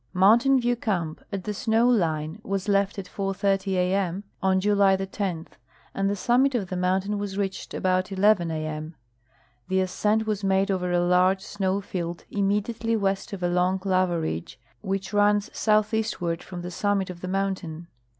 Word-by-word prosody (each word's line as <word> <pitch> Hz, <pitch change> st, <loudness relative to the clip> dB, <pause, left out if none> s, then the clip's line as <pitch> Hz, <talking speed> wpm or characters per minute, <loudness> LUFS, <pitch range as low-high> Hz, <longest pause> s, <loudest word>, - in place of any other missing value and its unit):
Mountain 235 Hz, +8 st, +5 dB
View 240 Hz, 0 st, +1 dB
camp, 175 Hz, -9 st, -2 dB
at 195 Hz, -2 st, -4 dB
the 210 Hz, -, -3 dB
snow 225 Hz, +3 st, +2 dB
line, 165 Hz, -5 st, 0 dB
Avas 195 Hz, -4 st, -3 dB
left 200 Hz, 0 st, +1 dB
at 195 Hz, -, -5 dB
4:30 195 Hz, 0 st, -1 dB
a. 180 Hz, 0 st, +1 dB
m. 195 Hz, 0 st, -1 dB, 0.2 s
on 190 Hz, 0 st, +3 dB
July 200 Hz, -1 st, +4 dB
10, 190 Hz, -3 st, -3 dB, 0.5 s
and 195 Hz, 0 st, 0 dB
the 200 Hz, -, 0 dB
summit 250 Hz, +6 st, +2 dB
of 200 Hz, -6 st, -1 dB
the 185 Hz, -, -3 dB
mountain 185 Hz, +3 st, 0 dB
Avas 200 Hz, -1 st, -4 dB
reached 195 Hz, -2 st, -3 dB
about 185 Hz, 0 st, +1 dB
11:00 195 Hz, -2 st, +2 dB
a. -, -, -3 dB
m. 155 Hz, +1 st, -5 dB, 0.7 s
The 190 Hz, 0 st, +1 dB
ascent 210 Hz, +4 st, 0 dB
Avas 210 Hz, -2 st, -2 dB
madeover 190 Hz, -2 st, +1 dB
a 175 Hz, -, +3 dB
large 185 Hz, +2 st, +3 dB
snoAV 195 Hz, -1 st, -2 dB
field 175 Hz, -2 st, -5 dB
imme 200 Hz, 0 st, +1 dB
diately 230 Hz, 0 st, -2 dB
west 195 Hz, +2 st, -1 dB
of 195 Hz, -3 st, -6 dB
a -, -, +3 dB
long 180 Hz, +2 st, +1 dB
lava 185 Hz, -3 st, +2 dB
ridge 85 Hz, -, -4 dB, 0.2 s
Avhich 195 Hz, +1 st, -3 dB
runs 205 Hz, +1 st, +3 dB
southeastward 215 Hz, -5 st, +1 dB
Irom 180 Hz, -1 st, -8 dB
the 180 Hz, -, -5 dB
summit 200 Hz, 0 st, 0 dB
of 175 Hz, -1 st, -11 dB
the 185 Hz, -, -5 dB
mountain. 185 Hz, -4 st, -2 dB
195 Hz, 175 wpm, -25 LUFS, 180-205 Hz, 0.7 s, Mountain